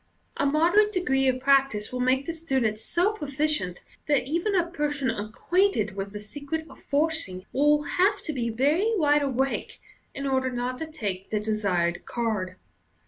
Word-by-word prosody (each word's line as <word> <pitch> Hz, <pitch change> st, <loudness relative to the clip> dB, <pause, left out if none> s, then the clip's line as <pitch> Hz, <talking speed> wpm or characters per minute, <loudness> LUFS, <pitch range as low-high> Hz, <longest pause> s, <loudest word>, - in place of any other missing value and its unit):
A 280 Hz, -, +2 dB
moderate 345 Hz, +9 st, +4 dB
degree 270 Hz, -9 st, +1 dB
of 255 Hz, 0 st, +2 dB
practice 270 Hz, -5 st, +2 dB
will 250 Hz, -, -2 dB
make 260 Hz, +2 st, +2 dB
the 335 Hz, -, -3 dB
student 265 Hz, -10 st, -1 dB
so 350 Hz, -, +1 dB
pro 370 Hz, -9 st, -6 dB
ficient 280 Hz, -, -1 dB, 0.3 s
that 290 Hz, -2 st, +3 dB
even 340 Hz, +9 st, -1 dB
a 350 Hz, -2 st, +3 dB
person 295 Hz, -5 st, -1 dB
acquainted 215 Hz, -, 0 dB
with 200 Hz, 0 st, -4 dB
the 210 Hz, -, -5 dB
secret 290 Hz, +9 st, -5 dB
of -, -, -15 dB
forcing 285 Hz, -, -1 dB
will 295 Hz, +2 st, +3 dB
have 380 Hz, +8 st, +2 dB
to 310 Hz, -, -3 dB
be 240 Hz, -3 st, -1 dB
very 300 Hz, -, +2 dB
wide 295 Hz, -5 st, +3 dB
awake 270 Hz, -1 st, -1 dB, 0.4 s
in 280 Hz, -, -4 dB
order 260 Hz, -1 st, +1 dB
not 250 Hz, +1 st, -3 dB
to 320 Hz, -, -4 dB
take 205 Hz, -12 st, -5 dB
the 215 Hz, -, 0 dB
desired 200 Hz, -5 st, 0 dB
card. 215 Hz, -6 st, -2 dB
275 Hz, 170 wpm, -26 LUFS, 220-315 Hz, 0.4 s, moderate